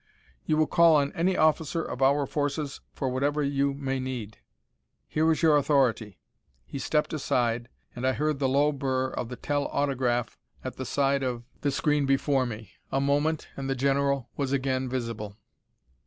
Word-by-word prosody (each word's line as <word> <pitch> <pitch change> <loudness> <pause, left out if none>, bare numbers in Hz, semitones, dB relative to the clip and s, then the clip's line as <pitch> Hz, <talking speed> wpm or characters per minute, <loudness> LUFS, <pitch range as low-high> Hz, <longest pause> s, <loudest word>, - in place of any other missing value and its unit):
"You 155 - +2
will 155 - +4
call 170 0 +5
on 140 -1 +2
any 180 +3 +1
officer 155 +1 +2
of 125 - -6
our 140 +2 +4
forces 145 0 -2
for 135 - -3
whatever 145 +4 0
you 140 0 0
may 135 -1 -2
need. 125 -5 -5 0.7
Here 160 +1 +2
is 160 - -1
your 155 -2 +6
authority." 125 - +1 0.5
He 140 - -6
stepped 150 +4 0
aside, 120 -5 0 0.3
and 125 +1 -1
I 130 - +3
heard 150 +1 -1
the 135 -2 +1
low 145 +3 +3
burr 130 -2 -1
of 120 - -4
the 125 - -5
tel 145 +2 -1
autograph 130 -4 -1 0.2
at - - -6
the - - -4
side 140 -1 +1
of 125 -3 -2 0.2
the 145 - +1
screen 145 0 +1
before 135 -1 +2
me. 110 -3 -8 0.2
A 135 - +1
moment, 145 +3 0
and 135 -1 -4
the 135 - 0
general 140 -1 +1
was 140 -2 -2
again 130 -1 0
visible. 115 -5 -4
140 Hz, 175 wpm, -27 LUFS, 130-145 Hz, 0.7 s, your